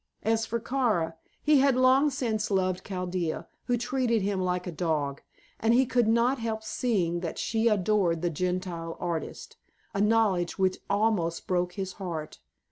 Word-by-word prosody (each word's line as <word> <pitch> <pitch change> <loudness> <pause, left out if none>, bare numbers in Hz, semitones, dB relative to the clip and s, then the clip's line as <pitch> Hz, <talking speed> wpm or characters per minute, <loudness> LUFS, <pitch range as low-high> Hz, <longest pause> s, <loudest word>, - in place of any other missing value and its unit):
As 225 +1 +1
for 235 - -1
Kara, 225 -9 0 0.3
he 300 -2 +5
had 275 -1 +4
long 260 +3 +5
since 225 -5 -1
loved 185 -2 0
Chaldea, 180 -3 -3 0.2
who 245 - +1
treated 245 -3 0
him 195 -1 0
like 180 0 -1
a 180 - -4
dog, 155 -4 -1 0.4
and 225 +1 +3
he 260 +2 +5
could 245 -2 +2
not 235 +4 +3
help 220 -1 -3
seeing 195 -7 0
that 170 -2 -4
she 225 +1 0
adored 195 -5 +2
the 175 - +1
Gentile 180 0 -3
artist 170 -2 -4 0.4
a 200 - 0
knowledge 210 -5 +2
which 190 -1 +1
almost 200 -5 +1
broke 180 -1 0
his 190 0 -4
heart. 165 -5 -5
200 Hz, 160 wpm, -28 LUFS, 175-230 Hz, 0.4 s, he